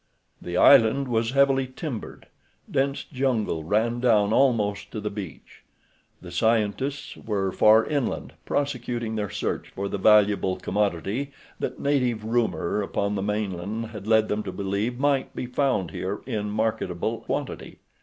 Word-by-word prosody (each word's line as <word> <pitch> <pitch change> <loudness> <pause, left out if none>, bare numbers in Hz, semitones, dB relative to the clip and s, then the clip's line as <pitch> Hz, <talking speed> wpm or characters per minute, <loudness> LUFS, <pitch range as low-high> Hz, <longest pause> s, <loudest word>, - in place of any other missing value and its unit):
The 90 0 -4
island 135 +1 +6
was 115 -1 +1
heavily 135 -1 +3
timbered. 130 -2 -7 0.5
Dense 135 +1 0
jungle 125 - -1
ran 110 +7 +1
down 110 -4 +3
almost 115 -6 +2
to 110 - -5
the 105 0 -3
beach. 100 -5 -9 0.6
The - - -9
scientists 115 +5 0
were 100 -3 -2
far 110 +4 +5
inland, 140 -5 -2
prosecuting 120 -5 -2
their 105 -2 -2
search - - -3
for 100 +1 -4
the 100 - -3
valuable 100 -2 +4
commodity 105 - -1 0.3
that - - -4
native 125 -6 +1
rumor 110 -4 0
upon 100 0 -1
the 100 - -2
mainland 105 +2 -3
had 105 -2 -8
led 110 -1 +4
them 105 +1 -1
to - - -5
believe 100 +5 -2
might 140 0 0
be - - -3
found 125 - 0
here 95 +5 -4
in 105 -5 -3
marketable 110 +1 -1
quantity. - - -5
110 Hz, 145 wpm, -25 LUFS, 100-125 Hz, 0.6 s, island